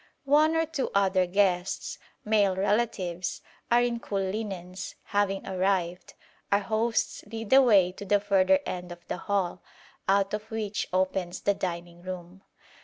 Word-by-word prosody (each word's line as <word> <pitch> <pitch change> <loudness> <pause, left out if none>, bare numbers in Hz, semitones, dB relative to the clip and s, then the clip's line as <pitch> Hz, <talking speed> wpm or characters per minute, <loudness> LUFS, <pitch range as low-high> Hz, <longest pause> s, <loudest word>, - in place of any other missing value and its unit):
One 305 +3 +4
or 325 0 +2
two 310 -4 -2
other 190 -2 +3
guests, 185 -1 0 0.3
male 205 -3 +3
relatives, 190 -4 -1 0.3
all 240 +1 +5
in 240 -1 0
cool 205 - -4
linens, 190 -2 -5
having 200 -1 0
arrived, 185 -2 -1 0.4
our 200 - +6
hosts 225 +2 0
lead 225 -2 -6
the 270 +1 +8
way 200 -8 +5
to 195 +2 -9
the 205 +1 +3
further 205 +7 +3
end 180 -1 -5
of 175 0 -11
the - - -3
hall, 185 -2 -1 0.5
out 195 0 +3
of 215 +1 -4
which 215 -2 -2
opens 185 -1 -1
the 200 - +2
dining 175 -2 -5
room. 180 0 -8
195 Hz, 150 wpm, -28 LUFS, 180-215 Hz, 0.5 s, the